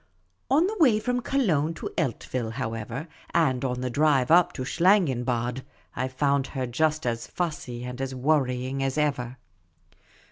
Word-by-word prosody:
On 300 +6 +4
the 425 +4 -2
way 245 -10 +5
from 245 +3 -1
Cologne 165 - +1
to - - -6
Eltville, 125 -5 -2
however, 115 +6 -4 0.3
and 130 -7 +2
on 125 -1 -2
the 130 - -1
drive 140 -1 +3
up 175 +1 +6
to 130 - -4
Schlangenbad, 130 - +1 0.3
I 130 - -1
found 140 +1 +1
her 130 -2 -3
just 155 +5 0
as 115 -1 -2
fussy 140 -8 -4
and 125 +1 -6
as 135 0 -3
worrying 130 -1 0
as 135 +1 -1
ever. 130 -4 -1
135 Hz, 150 wpm, -26 LUFS, 125-160 Hz, 0.3 s, up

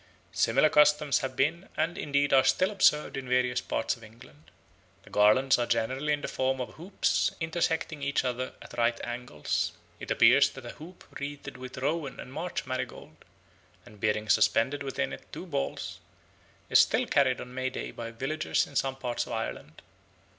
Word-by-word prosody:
Similar 135 +7 +3
customs 150 -1 +4
have 130 -1 -4
been 160 +8 0
and 160 +2 0
indeed 140 -1 0
are 135 -1 +7
still 185 +8 +3
observed 170 -7 +3
in 130 -2 -6
various 125 -1 +2
parts - - -1
of 115 - -17
England. 110 - -16 0.5
The - - -17
garlands 125 +6 +4
are 120 - 0
generally 130 +6 0
in 145 0 0
the - - -3
form 130 0 -1
of 125 - -5
hoops 180 +5 0
intersecting 160 -2 -1
each 140 -1 0
other 125 0 -2
at - - -13
right 115 0 +2
angles. 120 -10 -2 0.3
It - - -8
appears - - +6
that - - -10
a - - -6
hoop 175 +4 -13 0.2
wreathed 140 0 -6
with 130 0 -9
rowan 145 +2 -2
and 130 - -9
marsh 170 +4 -4
marigold, 130 0 -5 0.7
and 105 - -15
bearing 110 0 0
suspended 115 +7 +3
within 135 - -2
it - - -11
two - - -7
balls, 70 - -3 0.7
is - - +5
still - - +4
carried 130 -3 +2
on 125 - -8
May 130 0 -1
Day - - -5
by 115 -1 -6
villagers 135 +7 -1
in 140 - -15
some 135 0 0
parts 125 -3 -3
of - - -5
Ireland. 95 -8 -5
130 Hz, 175 wpm, -29 LUFS, 120-150 Hz, 0.7 s, are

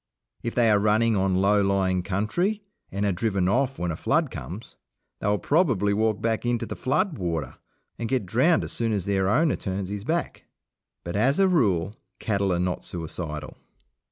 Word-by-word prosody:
If 115 - -4
they 115 -3 +4
are 105 - +4
running 110 +2 +3
on 95 -1 +1
low 100 +2 +3
lying 95 -2 +1
country 110 - -1 0.3
and 100 +2 -1
are 100 - +2
driven 95 -1 0
off 135 +7 +1
when 90 -1 -2
a - - -3
flood - - +1
comes, 90 - -8 0.4
they - - -2
will 105 0 +3
probably 115 - +2
walk 110 0 +1
back 115 -1 -1
into 120 -1 0
the - - -6
flood 155 - 0
water 85 -4 -3 0.4
and 115 -1 -3
get 130 -5 0
drowned 130 - +3
as - - -5
soon 115 -2 -1
as 100 -4 -1
their 95 -1 +1
owner 150 +8 +3
turns 95 -1 -4
his 100 0 -5
back. 165 +8 -2 0.6
But, 85 +2 -5
as 130 +8 +2
a 195 0 +5
rule, 105 - +1 0.2
cattle 100 -3 0
are 90 - +1
not 90 0 -1
suicidal. 80 -3 -6
105 Hz, 185 wpm, -25 LUFS, 95-120 Hz, 0.6 s, a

